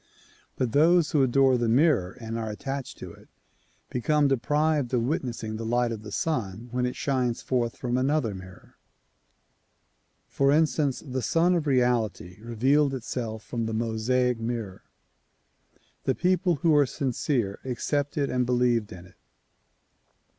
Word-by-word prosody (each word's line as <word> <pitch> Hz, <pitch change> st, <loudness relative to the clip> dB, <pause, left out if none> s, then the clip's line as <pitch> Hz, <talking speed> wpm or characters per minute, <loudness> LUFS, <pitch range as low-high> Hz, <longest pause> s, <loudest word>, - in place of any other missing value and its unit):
But 125 Hz, -3 st, -1 dB
those 160 Hz, +4 st, +4 dB
who 150 Hz, -4 st, +3 dB
adore 130 Hz, 0 st, +3 dB
the 120 Hz, -, 0 dB
mirror 120 Hz, -, +3 dB
and 115 Hz, -1 st, -5 dB
are 115 Hz, -1 st, -3 dB
attached 135 Hz, +5 st, -5 dB
to -, -, -9 dB
it, -, -, -19 dB, 0.6 s
become 145 Hz, +4 st, +2 dB
deprived 145 Hz, +1 st, +1 dB
of 120 Hz, -, +1 dB
witnessing 120 Hz, -5 st, -3 dB
the 115 Hz, -, -5 dB
light 120 Hz, +1 st, +1 dB
of 110 Hz, -2 st, -5 dB
the 105 Hz, -1 st, -9 dB
Sun 115 Hz, -6 st, -3 dB
when 125 Hz, 0 st, 0 dB
it 125 Hz, -, -4 dB
shines 130 Hz, -5 st, -1 dB
forth 120 Hz, -3 st, -1 dB
from 125 Hz, 0 st, -1 dB
another 135 Hz, -4 st, +1 dB
mirror. 95 Hz, -1 st, -12 dB, 1.5 s
For 140 Hz, 0 st, +2 dB
instance, 145 Hz, -3 st, +1 dB
the 130 Hz, -2 st, -3 dB
Sun 165 Hz, +9 st, +2 dB
of 165 Hz, -4 st, 0 dB
Reality 120 Hz, -8 st, 0 dB
revealed 135 Hz, +5 st, +2 dB
itself 115 Hz, -3 st, -5 dB
from 115 Hz, -2 st, -3 dB
the 110 Hz, -, -3 dB
Mosaic 115 Hz, +2 st, 0 dB
mirror. 115 Hz, -4 st, -4 dB, 1.2 s
The 130 Hz, -, +1 dB
people 180 Hz, -1 st, +2 dB
who 165 Hz, +3 st, +1 dB
were 145 Hz, -2 st, +4 dB
sincere 125 Hz, -5 st, -1 dB
accepted 140 Hz, +3 st, -1 dB
and 125 Hz, 0 st, +1 dB
believed 120 Hz, -3 st, +1 dB
in 90 Hz, -1 st, -10 dB
it. 90 Hz, -, -20 dB
125 Hz, 145 wpm, -26 LUFS, 115-145 Hz, 1.5 s, those